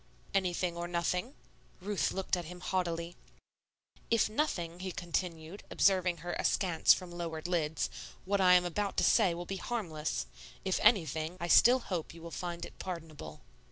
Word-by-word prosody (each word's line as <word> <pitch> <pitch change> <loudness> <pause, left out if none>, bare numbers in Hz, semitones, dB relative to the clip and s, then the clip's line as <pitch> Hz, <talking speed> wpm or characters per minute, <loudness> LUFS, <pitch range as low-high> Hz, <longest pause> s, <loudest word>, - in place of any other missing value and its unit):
"Anything 180 -2 0
or 170 0 -3
nothing." 180 - -1 0.4
Ruth 200 +1 -1
looked 190 0 -1
at 175 -1 -5
him 180 +2 -9
haughtily. 170 -2 -2 0.9
"If 230 -2 +3
nothing," 175 - -1
he 185 0 -4
continued, 170 +1 -4
observing 185 -3 +3
her 175 - -2
askance 175 -5 +3
from 180 -2 +2
lowered 170 -2 -5
lids, 160 -3 0 0.4
"what 200 +1 +1
I 180 -1 +7
am 180 0 +4
about 200 +3 -2
to - - +3
say 190 -7 +4
will 175 +1 -5
be 195 +2 -4
harmless. 160 - -3 0.4
If 190 - +1
anything, 165 -4 +2
I 170 - -3
still 245 +8 +7
hope 175 -6 -4
you 165 - -12
will 170 - -8
find 175 -1 -4
it - - -14
pardonable." 165 -4 -7
175 Hz, 160 wpm, -32 LUFS, 170-190 Hz, 0.9 s, I